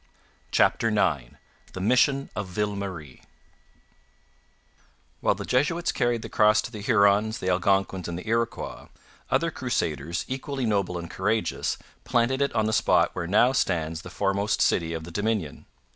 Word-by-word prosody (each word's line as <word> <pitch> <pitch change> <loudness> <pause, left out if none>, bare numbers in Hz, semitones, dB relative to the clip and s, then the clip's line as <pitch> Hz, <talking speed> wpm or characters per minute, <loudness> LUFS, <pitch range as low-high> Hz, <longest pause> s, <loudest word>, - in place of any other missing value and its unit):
CHAPTER 115 - +3
IX 80 - 0 0.4
THE - - -6
MISSION 125 +7 +2
OF 100 -2 -3
VILLE 105 +3 -2
MARIE 90 -10 -7 2.0
While - - +2
the - - -6
Jesuits 150 +7 +1
carried 120 -3 0
the - - -5
Cross 105 -1 +3
to - - -7
the 105 -3 -7
Hurons, 105 -1 +3
the 95 - -2
Algonquins, 95 0 +1
and 85 -1 -4
the 90 - -8
Iroquois, 115 +1 -2 0.4
other - - +1
crusaders, 75 +3 -2
equally 135 0 -3
noble 100 -5 0
and 85 0 -6
courageous, 105 +6 -1 0.3
planted 125 +2 +1
it 140 - +2
on 110 -1 +2
the 110 - 0
spot - - +3
where 85 -2 -4
now 110 +7 +4
stands 85 -9 -1
the - - -10
foremost 100 +1 0
city 80 0 +2
of 80 - -5
the 85 - -9
Dominion. 105 -5 -2
105 Hz, 155 wpm, -26 LUFS, 90-115 Hz, 2.0 s, now